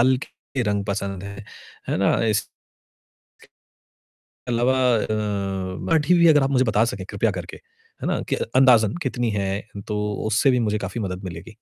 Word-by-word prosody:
हल्के 130 +1 0
रंग 100 -2 0
पसंद 100 -2 -3
हैं, 100 +1 -8 0.4
है - - 0
ना? 95 - +3
इस 105 -1 +1 2.0
अलावा 120 +2 +2 0.2
अ, 110 - 0 0.9
काठी 160 +1 +3
भी 170 - +6
अगर 150 -3 +6
आप 135 - +1
मुझे 130 -1 +3
बता 110 0 +3
सकें, 120 +2 -4
कृपया - - 0
करके - - -7 0.4
है - - -2
ना, - - 0
कि - - +2 0.2
अंदाजन 120 -5 +5
कितनी 120 -3 -1
है? 100 -1 -1 0.3
तो 105 -1 -2 0.3
उससे 115 +5 +3
भी 125 - +2
मुझे 105 - 0
काफ़ी 100 +2 -4
मदद 90 -1 -4
मिलेगी। 90 +4 -8
110 Hz, 160 wpm, -23 LUFS, 100-130 Hz, 2.0 s, भी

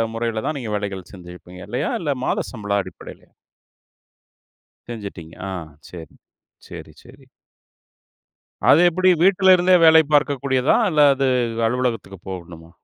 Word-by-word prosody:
முறையில 115 -1 -3
தான், 155 - -2
நீங்க 110 -4 -6
வேலைகள் 100 -3 -6
செஞ்சுருப்பீங்க 90 0 -13
இல்லயா! 125 - -3
இல்ல, 145 -3 -1
மாத - - -2
சம்பளம் 100 -3 -2
அடிப்படையிலயா? 95 - -13 1.6
செஞ்சுட்டீங்க. 100 -8 -9 0.2
ஆ, - - -6 0.4
சரி. 85 -2 -11 0.5
சரி, - - -11
சரி. - - -18 1.4
அது 155 - +6
எப்பிடி, 185 +2 +1
வீட்டுல 190 0 +5
இருந்தே 180 +1 +3
வேலை 160 0 +7
பார்க்க 145 -2 +2
கூடியதா? 130 0 +1
அல்லது 140 -4 +3 0.4
அலுவலகத்துக்கு 115 -5 -3
போகணுமா? 85 -3 -10
115 Hz, 115 wpm, -20 LUFS, 95-145 Hz, 1.6 s, வேலை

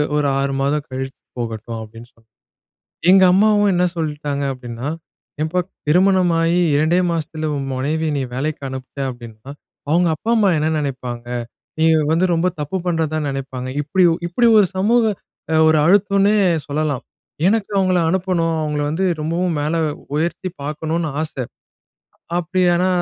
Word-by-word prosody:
ஒரு 150 -1 +2
6 135 0 -1
மாதம் 145 +1 0
கழிச்சு 135 +1 -5 0.2
போகட்டும்." 115 0 -5
அப்படீன்னு 115 +2 -11
சொன்னாங்க. 115 -1 -31 0.8
எங்க 190 0 +7
அம்மாவும் 205 +1 +4
என்ன 180 0 +2
சொல்லிட்டாங்க 150 -3 -3
அப்படீன்னா, 125 0 -7 0.6
"ஏம்பா 160 +4 0 0.3
திருமணமாயி 175 -1 +3 0.2
2டே 160 +4 +3
மாசத்தில 155 -1 -3
உன் 135 -1 -3
மனைவியை 155 +4 -1
நீ - - -1
வேலைக்கு 150 +4 -3
அனுப்பிட்ட 130 +1 -7
அப்படீன்னா, 120 0 -12 0.4
அவுங்க 175 +2 +3
அப்பா, 220 - -6
அம்மா 210 -3 +4
என்ன 155 +1 +1
நெனைப்பாங்க? 125 -4 -4 0.5
நீ 160 - +4 0.3
வந்து 165 +3 +3
ரொம்ப 170 +2 +1
தப்பு 150 +6 -2
பண்றதா 160 -2 0
நெனைப்பாங்க." 130 -2 -5
இப்படி 180 +5 +2
ஒ - - -1
இப்படி 235 +7 +3
ஒரு 200 - +4
சமூக 230 +5 +3 0.5
அ - - +3
ஒரு 155 - +4
அழுத்தம்ன்னே 200 +3 +4 0.3
சொல்லலாம். 145 -2 -1 0.4
எனக்கு 210 0 +1
அவுங்கள 185 -1 +2
அனுப்பணும், 175 -2 0
அவுங்கள 150 -1 -2
வந்து 160 +5 -1 0.2
ரொம்பவும் 170 +2 -1
மேல 155 +3 -1 0.4
உயர்த்தி 170 +4 -1
பார்க்கணும்ன்னு 155 +2 -2
ஆசை. 150 -4 -4 0.9
அப்படி 175 +2 -1
ஆனா 180 +2 +2
155 Hz, 140 wpm, -19 LUFS, 140-180 Hz, 0.9 s, எங்க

